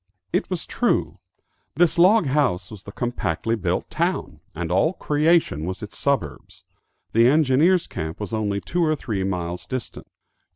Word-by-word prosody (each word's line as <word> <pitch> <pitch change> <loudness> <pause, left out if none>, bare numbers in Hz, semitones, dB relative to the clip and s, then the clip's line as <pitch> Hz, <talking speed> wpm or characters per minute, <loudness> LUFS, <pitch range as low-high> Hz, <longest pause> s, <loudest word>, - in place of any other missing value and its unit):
It - - 0
was 180 -3 -3
true. 245 - 0 0.6
This 175 -1 +2
log 190 +2 +6
house 130 -11 0
was 105 -3 -11
the 100 - -8
compactly 115 -3 -2
built 90 -4 -2
town, - - -2 0.2
and 85 +1 -3
all 125 - +2
creation 150 - +1
was 95 +5 -5
its 105 - -8
suburbs. 80 - -3 0.5
The 115 +1 +5
engineers' 155 +5 +4
camp 80 +1 -6
was 105 0 -5
only 100 -2 -1
two 175 0 -1
or 155 -1 +2
three 105 -9 -3
miles 90 -2 -3
distant. 130 -3 -6
115 Hz, 155 wpm, -23 LUFS, -, 0.6 s, log